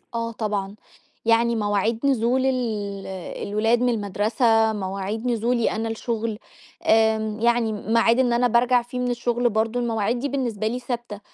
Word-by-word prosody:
آه 230 Hz, 0 st, -2 dB
طبعًا، 205 Hz, -3 st, -3 dB, 0.5 s
يعني 230 Hz, +1 st, +3 dB
مواعيد 215 Hz, +4 st, 0 dB
نزول 255 Hz, 0 st, +2 dB
ال 255 Hz, -2 st, +1 dB, 0.8 s
الولاد 225 Hz, +4 st, +1 dB
من 250 Hz, -, +3 dB
المدرسة، 220 Hz, +1 st, +2 dB
مواعيد 200 Hz, +3 st, -4 dB
نزولي 235 Hz, 0 st, +1 dB
أنا 225 Hz, +1 st, -2 dB
الشُغل 225 Hz, -1 st, -3 dB, 0.5 s
آمم 220 Hz, -1 st, +2 dB
يعني 235 Hz, -1 st, +2 dB
معاد 230 Hz, +3 st, +2 dB
إن 245 Hz, -2 st, +3 dB
أنا 245 Hz, +1 st, +3 dB
بارجع 245 Hz, +1 st, +3 dB
فيه 245 Hz, +1 st, -7 dB
من 250 Hz, 0 st, 0 dB
الشُغل 240 Hz, 0 st, 0 dB
برضه، 220 Hz, +2 st, 0 dB
المواعيد 230 Hz, 0 st, 0 dB
دي 285 Hz, +3 st, -2 dB
بالنسبة 235 Hz, -6 st, -2 dB
لي 240 Hz, +3 st, -2 dB
ثابتة. 240 Hz, -4 st, -5 dB
230 Hz, 150 wpm, -23 LUFS, 220-240 Hz, 0.8 s, يعني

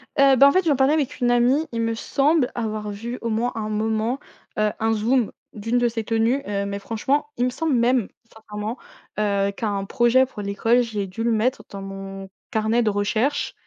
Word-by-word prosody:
Heu, 275 Hz, -2 st, +6 dB
bah, 275 Hz, -, +8 dB
en -, -, +5 dB
fait, 370 Hz, +4 st, +2 dB
j'en 300 Hz, -3 st, +3 dB
parlais 270 Hz, +2 st, +3 dB
avec 295 Hz, -2 st, -1 dB
une 245 Hz, -2 st, +2 dB
amie, 250 Hz, +6 st, +3 dB
il 230 Hz, -1 st, -2 dB
me 230 Hz, 0 st, 0 dB
semble 275 Hz, +4 st, +1 dB
avoir 215 Hz, -2 st, -3 dB
vu 235 Hz, +5 st, -5 dB
au 230 Hz, -, -2 dB
moins 230 Hz, +3 st, 0 dB
à -, -, -3 dB
un 215 Hz, -1 st, -3 dB
moment, 220 Hz, +4 st, -1 dB, 0.4 s
heu, 215 Hz, 0 st, +2 dB
un 225 Hz, 0 st, +1 dB
zoom 230 Hz, +2 st, +1 dB, 0.2 s
d'une 225 Hz, +3 st, -1 dB
de 245 Hz, 0 st, +3 dB
ses 225 Hz, -1 st, -3 dB
tenues, 230 Hz, +4 st, +1 dB
heu, 200 Hz, -1 st, -1 dB
mais 200 Hz, 0 st, -3 dB
franchement 265 Hz, +8 st, -1 dB
il 245 Hz, -, +2 dB
me -, -, +1 dB
semble 315 Hz, +4 st, -1 dB
même, 240 Hz, -2 st, +2 dB, 0.2 s
sincèrement, 215 Hz, +1 st, -6 dB, 0.4 s
heu, 200 Hz, -1 st, +1 dB
qu'à 215 Hz, +3 st, -4 dB
un 200 Hz, -1 st, -2 dB
projet 240 Hz, +5 st, +3 dB
pour 245 Hz, -5 st, -9 dB
l'école, 215 Hz, +4 st, +2 dB
j'ai 210 Hz, -4 st, -3 dB
dû 195 Hz, +5 st, -5 dB
le 235 Hz, -, +2 dB
mettre 230 Hz, +4 st, 0 dB
dans 200 Hz, -, -7 dB
mon 195 Hz, 0 st, -7 dB, 0.2 s
carnet 220 Hz, +2 st, +1 dB
de 220 Hz, -, +2 dB
recherche, 215 Hz, +7 st, 0 dB
225 Hz, 215 wpm, -23 LUFS, 210-250 Hz, 0.4 s, bah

